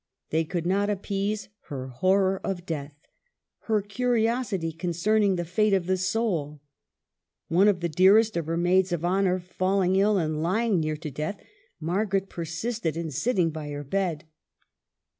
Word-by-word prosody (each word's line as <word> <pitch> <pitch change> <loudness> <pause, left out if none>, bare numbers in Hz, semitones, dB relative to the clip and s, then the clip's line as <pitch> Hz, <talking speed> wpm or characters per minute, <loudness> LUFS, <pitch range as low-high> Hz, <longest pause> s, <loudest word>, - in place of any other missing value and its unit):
They 160 +1 +1
could 170 0 -3
not 200 +3 +1
appease 205 +1 -2 0.2
her 130 -2 -5
horror 190 +8 +2
of 180 -2 -3
death, 145 -3 -5 0.7
her 215 -3 +1
curiosity 225 -5 0
concerning 185 +5 +1
the 175 -1 -2
fate 205 +5 +2
of 190 -3 +2
the 185 +1 +1
soul. 185 -6 -1 0.9
One 180 +5 +4
of 190 -4 +2
the 170 - +1
dearest 200 +7 +5
of 165 -2 -2
her 165 +1 -1
maids 180 +2 +3
of 175 -1 -1
honor 185 0 +2
falling 185 +1 0
ill 205 +1 +3
and 155 -3 -1
lying 200 +3 +1
near 155 -1 -1
to 155 -1 -6
death, 155 +9 -4 0.4
Margaret 195 +4 -1
persisted 170 +2 -3
in 165 -2 -3
sitting 170 - +1
by 155 -1 -6
her 145 0 -5
bed. 165 0 -2
185 Hz, 155 wpm, -26 LUFS, 165-200 Hz, 0.9 s, dearest